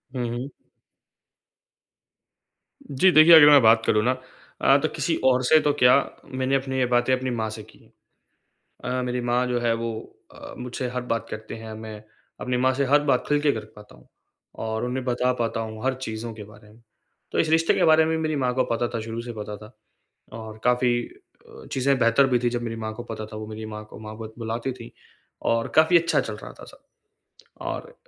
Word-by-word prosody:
हुँ, 125 -2 -2
हुँ। 130 +4 -5 2.4
जी 145 +7 +4
देखिए, 155 +1 +8
अगर 155 -2 +10
मैं 145 -2 +8
बात 110 0 +5
करूँ 105 0 +2
ना 125 - +2 0.5
अ, - - +5
तो - - 0
किसी - - 0
और 130 -1 +3
से 155 +5 +5
तो 150 - +2
क्या 125 -3 +5 0.4
मैंने 130 +1 0
अपनी 135 -1 -2
ये 130 - +2
बातें 120 +1 +2
अपनी 130 0 -1
माँ 110 -2 -2
से 110 0 -8
की - - -20
है। - - -24 0.9
अ, 125 0 -2
मेरी 125 0 -2
माँ 120 +1 0
जो 125 -1 -1
है 120 -1 +1
वो 115 0 -3 0.4
अ, - - -10
मुझसे 125 0 -4
हर 125 0 -3
बात 115 -1 -2
करते 110 0 -7
हैं, 110 -1 -9
मैं 110 0 -8 0.4
अपनी 125 0 -1
माँ 130 +1 +2
से 140 +1 0
हर 145 +3 +4
बात 125 - +1
खुल 145 0 +2
के 145 -1 +2
कर 110 -3 -5
पाता 105 0 -15
हूँ - - -22 0.6
और 110 +1 -2
उन्हें 125 +1 -3
बता 125 0 +1
पाता 115 -1 -1
हूँ 110 0 -7
हर 130 0 +1
चीज़ों 115 -3 -6
के 105 -1 -9
बारे 105 +1 -17
में। 115 - -21 0.5
तो - - -2
इस 160 - +2
रिश्ते 165 +1 +3
के - - +2
बारे 160 0 +5
में 160 0 0
मेरी 155 -1 -1
माँ 130 -3 0
को 130 0 +1
पता 120 +1 0
था 115 - -1
शुरू 115 +1 -5
से 120 0 -7
पता 105 -1 -7
था 105 +2 -14 0.7
और 110 -1 -9
काफ़ी 125 0 +2 0.5
अ, - - -14
चीज़ें 135 +1 +1
बेहतर 115 +3 +4
भी 125 -2 +2
थी 120 0 0
जब 120 0 -3
मेरी 115 -1 -4
माँ 110 - -4
को 120 +2 -8
पता 110 -2 -6
था - - -6
वो 110 0 -7
मेरी 110 0 -7
माँ 105 0 -7
को - - -12
माँ 110 0 -9
बत 110 -1 -8
बुलाती 115 +3 -3
थी 120 -2 -10 0.6
और 115 0 0
काफ़ी 160 +3 +6
अच्छा 170 0 +1
चल - - -3
रहा - - -10
था - - -10
सब। - - -17 0.8
और 485 - -5
120 Hz, 220 wpm, -24 LUFS, 110-130 Hz, 2.4 s, अगर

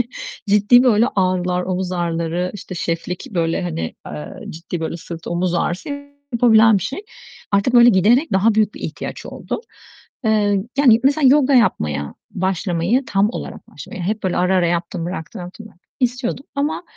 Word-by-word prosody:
hani 240 - -1 0.4
ciddi 210 +5 +5
böyle 230 -1 +4
ağrılar, 180 -1 +1
omuz 185 0 -3
ağrıları, 170 0 -2
işte 190 -2 -8
şeflik 170 +1 -3
böyle 170 -4 -1
hani, 120 - -4
aaa, 75 0 -8
ciddi 165 +1 -6
böyle 165 +1 -3
sırt, 165 0 -9
omuz 175 +1 -1
ağrısı 175 - -2 0.4
yapabilen 225 -3 +5
bir - - -6
şey. 270 - -4 0.5
Artık 200 +5 +2
böyle 240 0 +8
giderek 230 - +3
daha 205 +4 +3
büyük 215 -1 +2
bir - - -10
ihtiyaç - - -6
oldu. - - -5 0.6
Eee, 205 -3 +2
yani 235 -5 +6
mesela 280 0 +4
yoga 280 0 +4
yapmaya 75 - +1 0.2
başlamayı, 190 +5 0
tam 200 +1 +2
olarak - - -8
başlamayı, 185 - -9
hep 210 +4 -2
böyle 185 -2 -1
ara 185 +1 +2
ara 175 - +3
yaptım 170 0 -2
bıraktım, 180 +4 -6
yaptım 185 +5 -10
bıraktım, 195 -4 -21
istiyordum 250 +1 -1
ama 285 +4 -1
190 Hz, 165 wpm, -20 LUFS, 175-230 Hz, 0.6 s, böyle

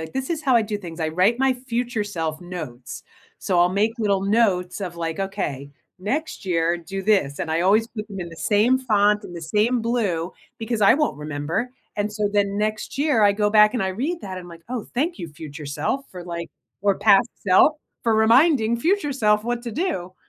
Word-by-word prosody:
like, 160 - -7
"This 265 0 -3
is 320 -2 -2
how 260 -4 +4
I 225 - +4
do 210 -1 -3
things." 170 -3 -9
I 160 - 0
write 185 +9 +2
my 265 0 +3
future 240 -3 -2
self 165 -5 -4
notes. 155 -9 -8 0.4
So, 180 - 0
I'll 175 0 +5
make 205 +4 +1
little 200 -3 +1
notes 195 -3 +1
of, 180 -3 -5
like, 165 0 -3
"Okay. 145 -8 -3 0.3
Next 290 +11 -3
year, 170 -2 +1
do 190 +3 -6
this," 190 -9 +2
and 160 - -3
I 160 +1 +1
always 210 +5 +3
put 215 -2 -7
them 195 -2 -7
in 170 - -5
the 165 - -12
same 220 +8 +3
font, 210 -4 +2
in - - -9
the 170 - -7
same 215 +8 +1
blue, 205 -8 -1 0.3
because 225 0 -2
I 200 +2 +6
won't 300 - 0
remember, 150 +11 -3 0.3
and 210 0 -1
so 210 -1 0
then 200 -1 +1
next 215 +4 -2
year, 285 -7 +2
I 205 - +6
go 210 0 +1
back, 210 +2 +6
and 230 - 0
I 190 - 0
read 280 - -2
that, 190 -2 -6
I'm 175 -1 -10
like, 165 -1 -12
"Oh, 245 -4 -4
thank 305 - -1
you, 170 - -6
future 150 0 -9
self, 150 - -2
for 180 -2 -9
like 170 -1 -6 0.3
or 200 -1 +1
past 200 -1 +5 0.2
self, 190 +11 +6 0.3
for 230 -2 +2
reminding 235 +1 +4
future 325 +1 +1
self 210 -4 +2
what 240 0 -2
to 235 - -5
do." 215 - -3
205 Hz, 215 wpm, -23 LUFS, 175-235 Hz, 0.4 s, I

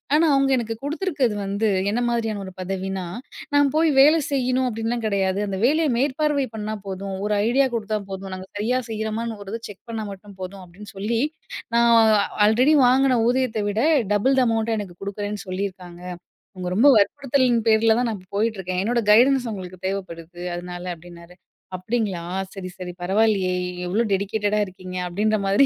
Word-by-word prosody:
ஆனா 325 - +4
அவுங்க 275 0 +2
எனக்கு 225 -2 -3
குடுத்துருக்கிறது 290 - -1
வந்து, 200 +3 0 0.2
என்ன 240 +3 0
மாரியான 225 -3 -1
ஒரு 190 - -9
பதவினா, 190 0 -3 0.5
நா 285 - +6 0.2
போய் 320 -1 +4
வேலை 310 +3 +6
செய்யணும் 255 -1 +1
அப்படின்லாம் 225 +1 -2
கிடையாது. 195 -2 0
அந்த 190 -1 -3
வேலைய 310 +3 +3
மேற்பார்வை 285 +1 +1
பண்ணா 215 0 -3
போதும். 195 0 -5
ஒரு 210 - 0 0.2
ஐடியா 270 +2 +3
குடுத்தா 215 -1 -2
போதும். 190 0 -6
நாங்க 185 0 -9
சரியா 240 +5 +1
செய்றோமான்னு, 220 0 -3
ஒரு 195 - -9
இத 230 - -3
செக் 200 - -13
பண்ணா 225 -1 -3
மட்டும் 195 0 -14
போதும். 185 +1 -7
அப்படின்னு 200 +4 -13
சொல்லி, 225 +4 -1 0.5
நா - - +5 0.6
ஆல்ரெடி 240 +8 +4
வாங்குன 260 0 +4
ஊதியத்த 245 -3 +1
விட, 205 +1 -1 0.3
டபுள் 210 +7 +3
த - - +5
அமௌண்ட்ட 225 0 0
எனக்கு 195 -4 -6
குடுக்குறேன்னு, 205 +1 -4
சொல்லியிருக்காங்க. 185 -2 -5 0.6
உங்க 180 -1 -4
ரொம்ப 230 +9 +5
வற்புறுத்தலின் 255 +3 +2
பேர்ல 220 0 +5
தான் 245 0 +1
நான் 220 -2 -2
இப்போ 185 0 -20
போயிட்டுருக்கேன் 195 -4 -1
என்னோட 235 +4 +1
கைடன்ஸ் 250 +3 +5
உங்களுக்கு 185 -3 -7
தேவைப்படுது 175 -3 -5
அதனால 175 0 -6
அப்படின்னாரு. 170 +1 -14 0.4
அப்படிங்களா! 195 -1 -2 0.3
சரி, 190 -2 -6
சரி, 180 -1 -6
பரவாயில்லையே! 195 0 +2 0.3
எவ்ளோ 210 +6 +1
டெடிகேட்டடா 205 +2 0
இருக்கீங்க! 185 -1 -8
அப்படின்ற 215 +5 +1
மாரி 200 +8 +4
210 Hz, 160 wpm, -23 LUFS, 190-240 Hz, 0.6 s, நா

